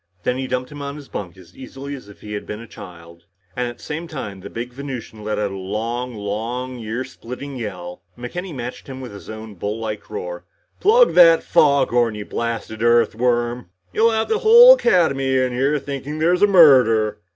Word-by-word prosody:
Then 125 +1 -1
he 130 - -3
dumped 125 +2 -3
him 145 -1 -8
in 140 0 -5
his 145 -2 -11
bunk 95 -2 -7
as 90 -1 -17
easily 135 +1 -8
as 130 -7 -10
if 100 - -16
he 105 - -8
had 105 - -6
been 105 - -6
a 115 - -10
child. 85 -6 -13 0.3
And 125 0 -1
at 120 - -7
the - - -17
same 160 +2 -5
time, 105 -11 -7
the - - -9
big 120 +2 -6
Venusian 125 -5 -7
let 105 0 -2
out 105 -1 -1
a - - -6
loud, 115 +6 -3
long, 120 +4 -5
earsplitting 125 +3 -6
yell. 90 -5 -7 0.2
McKenny 175 +10 -6
matched 125 -4 -7
him 130 -1 -8
with 130 -2 -8
his 100 - -11
bull 110 -1 -6
like 110 -1 -5
roar. - - -6 0.4
"Plug 470 +4 +5
that 165 -2 +7
foghorn, 120 -6 +3
you 105 -1 -6
blasted 115 -1 -4
Earthworm. 120 0 +1 0.2
You'll 225 +1 +4
have 220 -1 0
the 440 - 0
whole 475 +3 +9
Academy 140 - +2
in 130 -1 0
here 135 +4 +1
thinking 140 +1 -6
there's 170 +3 +2
a 205 - +6
murder." 125 - +5
125 Hz, 195 wpm, -21 LUFS, 110-140 Hz, 0.4 s, whole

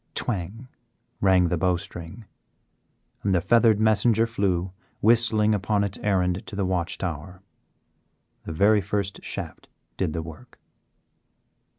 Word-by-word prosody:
Twang! 110 +3 -3 0.5
rang 95 -3 +3
the 85 - -1
bowstring, 90 +2 -3 1.0
and 100 -2 +1
the - - +3
feathered 110 +3 +3
messenger 110 +1 +3
flew 95 -5 -1 0.3
whistling 110 -1 +4
upon 100 0 0
its 100 -1 -3
errand 95 -1 0
to - - -8
the 100 -1 -1
watch 90 -1 -1
tower. 90 +1 -6 1.0
The - - -5
very 100 +6 +3
first 100 0 -3
shaft - - -7 0.3
did 75 - -1
the 80 - -3
work. 80 +10 -12
100 Hz, 120 wpm, -25 LUFS, 90-110 Hz, 1.0 s, whistling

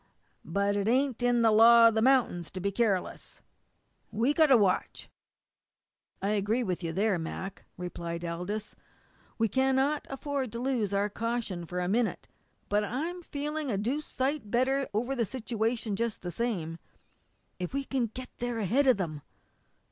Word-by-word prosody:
But 200 +4 0
it 200 0 0
ain't 255 +1 +1
in 245 -1 +3
the 225 - +5
law 230 +2 +8
of - - -3
the 220 - +1
mount'ins 240 -10 +2
to 185 - -4
be 200 +2 -1
careless. 200 -4 -1 0.7
We've 235 +7 +1
got 315 -2 +6
to 265 -3 +7
watch." 195 -4 0 1.1
"I 200 - +1
agree 210 +4 +1
with 180 -4 -2
you 165 -2 -2
there, 195 +1 +1
Mac," 190 +4 -6
replied 170 -1 -5
Aldous. 180 +6 -4 0.6
"We 225 - +2
cannot 265 +5 +1
afford 270 -2 -3
to 235 - -4
lose 245 -6 0
our 200 +1 +1
caution 225 -7 -3
for 180 +2 -3
a 180 - -1
minute. 225 +4 0 0.4
But 210 +1 +1
I'm 315 - -3
feeling 300 -2 -4
a 205 - 0
deuced 260 +9 -2
sight 265 -3 -1
better 265 +4 +1
over 240 +6 -1
the 240 - +1
situation 225 -1 -2
just 230 -1 -2
the 175 - -4
same. 170 -6 -3 0.8
If 180 - -3
we 275 +1 -2
can 270 - -4
only 235 -4 0
get 255 0 -6
there 245 -1 -2
ahead 235 +7 +2
of 255 - +5
them!" 155 -6 -4
225 Hz, 170 wpm, -29 LUFS, 195-260 Hz, 1.1 s, law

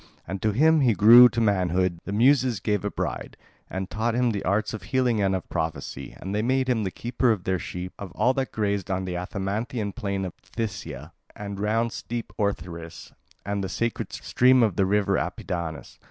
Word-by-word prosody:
And 95 +2 -5
to 110 - +2
him 155 +8 +4
when 135 - +3
he 115 - +3
grew 120 +6 +9
to 115 - -3
manhood 90 -4 +1
the - - -5
Muses 125 +1 +3
gave 105 0 -1
a 105 - -1
bride, - - -4 0.3
and 95 0 -4
taught 110 +3 -1
him 125 -1 +2
the 100 -2 -3
arts 100 +5 0
of 110 - -5
healing 120 +3 +1
and 95 -1 +2
of 95 - -5
prophecy; 80 0 -4
and 95 - -5
they 105 - +1
made 130 +3 +1
him 120 -4 +1
the 95 - -1
keeper 120 +4 0
of 100 -5 -1
their 95 0 0
sheep, 90 +2 -6
of 100 -3 -7
all 125 +5 +2
that 135 -1 -2
grazed 100 -3 -1
on 95 -1 -1
the 90 -1 -4
Athamantian 100 +4 -3
plain 100 -1 -3
of 90 - -6
Phthia 85 - -6 0.2
and 100 -1 -6
round 115 +3 0
steep 120 -1 -5
Othrys 85 -5 -4 0.3
and 100 -1 -2
the 95 - -3
sacred 115 0 -2
stream 125 0 +3
of 105 -5 +1
the 95 - +2
river 105 0 +2
Apidanus. 85 -4 -5
105 Hz, 200 wpm, -25 LUFS, 95-115 Hz, 0.3 s, grew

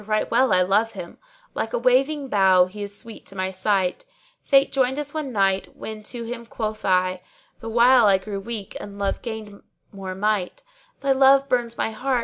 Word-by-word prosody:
right 215 0 0
well 250 0 +3
I 185 -1 +4
love 215 +5 +1
him, 175 -4 -9 0.2
* - - -32
Like 225 - -3
a - - +1
waving 270 +4 +2
bough 190 -5 +4
he 200 +3 -10
is 200 0 -4
sweet 230 -1 -9
to 195 - -10
my 185 0 -2
sight: 190 - 0 0.4
Fate 275 -1 +3
joined 265 0 +1
us 290 -1 -3
one 305 -4 -4
night, 195 -3 0
when 215 -1 -7
to 235 +2 -7
him 235 0 -7
quoth 215 -2 -5
I 185 -1 +1 0.2
* - - -36
(The 225 - -7
while 240 0 +5
I 195 -1 +5
grew 200 +1 -6
weak 205 -1 -7
and 200 0 -9
love 200 -1 -2
gained 220 -3 -7 0.3
more 190 -2 -7
might) 210 - -1 0.4
'Thy 275 0 +1
love 270 +1 +5
burns 240 -3 -1
my - - -1
heart!' 250 +3 -1
220 Hz, 205 wpm, -23 LUFS, 195-255 Hz, 0.4 s, while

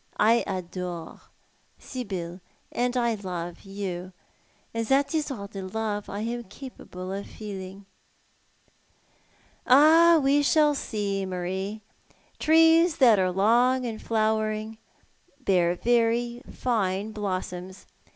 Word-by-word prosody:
I 230 +3 +4
adore 180 -2 -5 0.6
Sibyl, 190 -8 -6 0.3
and 245 +1 -1
I 235 -1 +2
love 180 -4 -6
you; 190 -2 -6 0.6
and 230 0 -1
that 275 +5 +2
is 310 -2 0
all 220 -8 -5
the 200 -1 -7
love 205 +2 -3
I 200 +1 -4
am 235 +1 -3
capable 190 -5 -9
of 200 +1 -5
feeling." 195 -2 -8 1.8
"Ah, 320 +5 +7
we 280 +2 +4
shall 295 +1 +4
see, 205 -7 -2
Marie. 190 +3 -4 0.6
Trees 325 +1 +5
that 235 -6 +6
are 185 -1 +2
long 240 +7 +3
in 225 -2 -4
flowering 220 0 -1 0.6
bear 180 -8 +2
very 235 +2 +1
fine 210 -4 -1
blossoms. 185 -2 -5
215 Hz, 110 wpm, -26 LUFS, 190-245 Hz, 1.8 s, Ah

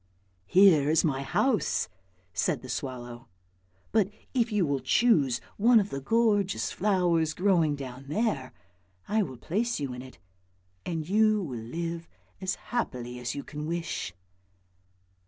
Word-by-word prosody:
" 90 0 -41
Here 170 - +6
is 160 +2 +3
my 135 -3 0
house," 235 - +1 0.5
said - - 0
the - - -9
swallow; 120 -1 -5 0.3
" 95 +1 -38
but 210 -3 +3 0.2
if 240 -3 +1
you 205 -4 +2
will 140 -2 0
choose 135 - +3 0.2
one 230 +2 +6
of 200 -1 -2
the 135 - -4
gorgeous 205 - +1
flowers 175 -6 +1
growing 175 -6 +3
down 135 -1 -8
there, 150 - -1 0.6
I 215 +2 +2
will 130 -11 -4
place 220 - -1
you 140 -3 -3
in 125 - -7
it, 130 0 -12 0.7
and 160 -3 -3
you 215 +1 +3
will 125 -8 -5
live 165 +7 -4 0.3
as 190 -1 -1 0.2
happily 125 - -2
as 120 0 -3
you 140 - -4
can 150 0 -6
wish." 165 - -3
160 Hz, 150 wpm, -28 LUFS, 130-205 Hz, 0.7 s, Here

